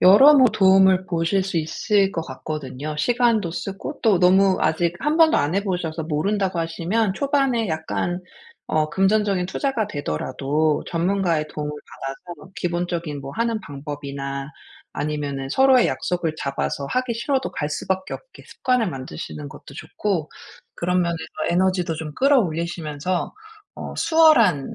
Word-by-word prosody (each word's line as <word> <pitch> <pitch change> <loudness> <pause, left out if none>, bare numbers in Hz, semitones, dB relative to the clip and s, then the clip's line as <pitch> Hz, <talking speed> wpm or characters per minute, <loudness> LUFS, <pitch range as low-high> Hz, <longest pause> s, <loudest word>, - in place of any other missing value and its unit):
여러 265 +11 +8
뭐 260 -2 +7
도움을 190 -1 +5
보실 170 +3 0
수 190 -2 -4
있을 195 +5 +1
것 165 - -2
같거든요. 145 +1 -6
시간도 235 -2 +2
쓰고 195 - -6
또 210 -6 +4
너무 190 +1 +5
아직 165 +2 +1
1 300 +1 +1
번도 325 -1 +5
안 150 +5 +1
해 200 - 0
보셔서 170 -4 -2
모른다고 185 +3 0
하시면 180 +6 -1
초반에 270 -3 +1
약간 165 +3 -2 0.5
어 155 -1 +1
금전적인 195 0 +1
투자가 230 0 -1
되더라도 145 - -1
전문가의 170 -3 0
도움을 150 -1 -4
받아서 150 +4 -9
기본적인 175 -4 -3
뭐 135 +1 -8
하는 230 -1 0
방법이나 140 -2 -6 0.4
아니면은 145 -3 -3
서로의 265 - +5
약속을 175 -3 -2
잡아서 140 0 -3
하기 255 -2 -1
싫어도 265 +3 -1
갈 150 - -2
수밖에 190 +5 -3
없게 - - -13
습관을 250 -4 0
만드시는 75 - -7
것도 - - -13
좋고 185 -8 -3 0.5
그런 180 +1 +1
면에서 170 -1 -1 0.3
에너지도 180 -1 +1
좀 155 -2 -6
끌어올리시면서 170 - 0 0.4
어 - - -7
수월한 240 - +4
175 Hz, 325 characters per minute, -22 LUFS, 155-205 Hz, 0.5 s, 여러